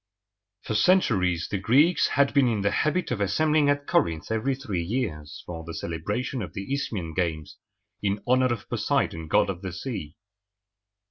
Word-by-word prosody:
For - - -3
centuries 100 - +3
the 100 - -1
Greeks 145 - +4
had 140 -1 +2
been 140 -3 +4
in 110 -4 0
the 100 - +1
habit 155 +2 0
of 115 -4 -1
assembling 150 +9 +2
at 145 0 +1
Corinth 80 - 0
every 115 +5 0
three 110 -10 -3
years 85 - -4
for 80 -2 -7
the 85 0 -7
celebration 105 +10 -3
of 90 -5 -6
the 100 +8 -4
Isthmian 100 -12 -3
games, 80 -4 -2 0.4
in 100 0 0
honor 130 0 +3
of 115 -4 -4
Poseidon, 80 -1 -1
god 80 - +3
of 90 -1 -8
the 95 -2 -5
sea. 90 - -6
105 Hz, 165 wpm, -26 LUFS, 85-130 Hz, 0.4 s, Greeks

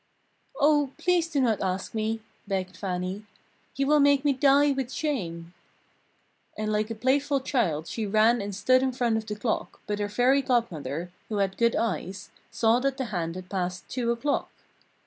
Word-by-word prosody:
"Oh, 290 -2 +3
please 355 -2 +2
do 290 - 0
not 230 -6 +2
ask 185 0 -2
me!" 220 0 -1 0.3
begged 190 -2 -2
Fannie, 185 +1 -3 0.5
"you 275 - 0
will 300 +2 +4
make 285 0 +4
me 285 - +4
die 280 +2 +4
with 265 -2 -2
shame!" 175 - -3 1.0
And 215 0 -2
like 215 +1 0
a 225 - -4
playful 275 +4 +1
child 185 - 0
she 220 +4 -3
ran 220 +3 +4
and 200 -1 -4
stood 255 +6 +4
in 260 -1 0
front 240 -2 +1
of 220 0 -5
the 210 - -3
clock, 220 +2 -3
but 210 0 -2
her 205 0 -1
Fairy 250 +6 +3
Godmother, 180 - -1 0.2
who 215 - -2
had 195 -1 0
good 235 -1 +2
eyes, 190 -2 -3 0.2
saw 230 0 +3
that 275 +1 -1
the 265 - -2
hand 165 -2 -2
had 185 0 -8
passed 180 -2 -3
two 245 -2 -2
o'clock. 280 +5 -1
225 Hz, 180 wpm, -27 LUFS, 195-265 Hz, 1.0 s, will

